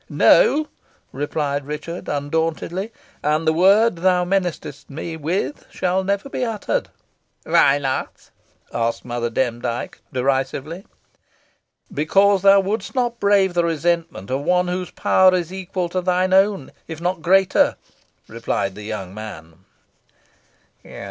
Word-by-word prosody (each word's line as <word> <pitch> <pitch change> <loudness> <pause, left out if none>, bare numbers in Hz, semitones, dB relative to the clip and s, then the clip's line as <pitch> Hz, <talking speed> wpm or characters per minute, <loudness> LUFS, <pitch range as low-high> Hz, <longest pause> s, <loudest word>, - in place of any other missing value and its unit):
"No," 310 -11 +4 0.4
replied 145 0 -2
Richard, 155 +4 -6
undauntedly. 165 +7 -2 0.3
"And 155 +2 0
the 160 - +4
word 195 +4 +4
thou 180 0 +2
menacest 180 -6 -3
me 160 +3 -6
with 170 - -3
shall 185 +1 -1
never 200 +6 -1
be 265 - -3
uttered." 230 - -2 0.5
"Why 140 +1 +4
not?" 135 -2 -4 0.4
asked 115 0 -1
Mother 120 -1 -2
Demdike, 120 0 -3
derisively. 135 +6 -2 1.1
"Because 195 +6 +3
thou 195 0 +6
wouldst 200 +4 -3
not 240 -2 -1
brave 200 -2 +3
the 175 -1 +2
resentment 165 - -1
of 135 +2 0
one 180 +3 +1
whose 180 0 -3
power 185 -1 +4
is 175 0 -3
equal 185 -1 -3
to 185 +1 -2
thine 185 +1 +1
own 195 -6 +2 0.2
if 160 -1 -7
not 175 0 -2
greater," 190 +3 +3 0.5
replied 95 - -2
the 105 - -10
young 105 -3 -6
man. 90 -5 -10
170 Hz, 125 wpm, -21 LUFS, 140-190 Hz, 1.1 s, thou